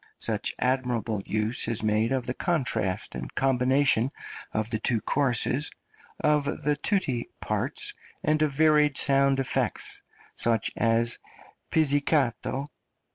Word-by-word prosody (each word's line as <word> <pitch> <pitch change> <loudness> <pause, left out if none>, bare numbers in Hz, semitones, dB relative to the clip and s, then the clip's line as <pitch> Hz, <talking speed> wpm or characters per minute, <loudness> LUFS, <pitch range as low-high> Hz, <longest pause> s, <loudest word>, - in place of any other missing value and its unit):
Such - - 0
admirable 125 -5 -1
use 110 +3 0
is 115 -2 0
made 110 +2 +1
of 130 -2 -1
the 125 - -3
contrast 130 - -2
and - - -7
combination 130 -1 +2 0.4
of 110 +1 -2
the 110 - -1
two 115 +1 +1
choruses, 135 +2 +3 0.5
of 150 -1 +2 0.2
the 150 0 +1
tutti 145 - 0
parts - - -1 0.3
and 155 0 +1
of 155 -2 +2
varied 150 0 +3
sound 135 -1 +4
effects, 130 -1 -2 0.3
such 115 -3 +1
as 115 +1 +2 0.5
_pizzicato, 140 -3 +1
&. - - -46
130 Hz, 125 wpm, -26 LUFS, 115-145 Hz, 0.5 s, sound